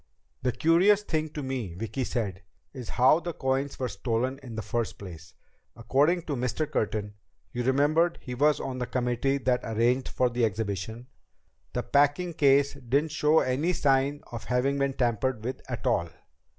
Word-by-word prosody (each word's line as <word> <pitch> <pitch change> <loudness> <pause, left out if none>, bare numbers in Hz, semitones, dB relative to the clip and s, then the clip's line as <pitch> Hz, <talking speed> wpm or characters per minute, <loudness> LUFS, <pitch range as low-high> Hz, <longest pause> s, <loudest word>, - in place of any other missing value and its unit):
"The 125 - +1
curious 185 - +4
thing 155 -4 -1
to 150 - -4
me," 125 -10 -4
Vicki 115 +7 -3
said, 100 -7 -3 0.3
"is 125 -4 -8
how 130 +6 +4
the 175 0 -5
coins 135 0 -1
were 130 - -1
stolen 120 +5 -2
in 120 -4 -9
the 110 - -4
first 120 -2 -2
place. 85 -4 -11 0.4
According 145 +9 +2
to 150 -4 -3
Mr. 125 +5 -1
Curtin 105 -7 -2 0.4
you 120 - -3
remember 150 +6 +3
he 125 - -7
was 145 +4 +3
on 130 -1 -4
the 125 - -2
committee 125 +2 0
that 125 -2 +1
arranged 120 +4 +1
for 125 -1 0
the 120 0 0
exhibition 110 +2 -2 0.7
the 125 - -1
packing 145 +5 +2
case 140 -2 +4
didn't 140 +3 -1
show 150 +1 +3
any 140 +8 0
signs 140 -1 +1
of 120 -2 -6
having 135 +3 +1
been 140 0 +1
tampered 120 -1 0
with 130 +3 -4
at - - -5
all." 85 0 +1
130 Hz, 170 wpm, -27 LUFS, 120-145 Hz, 0.7 s, curious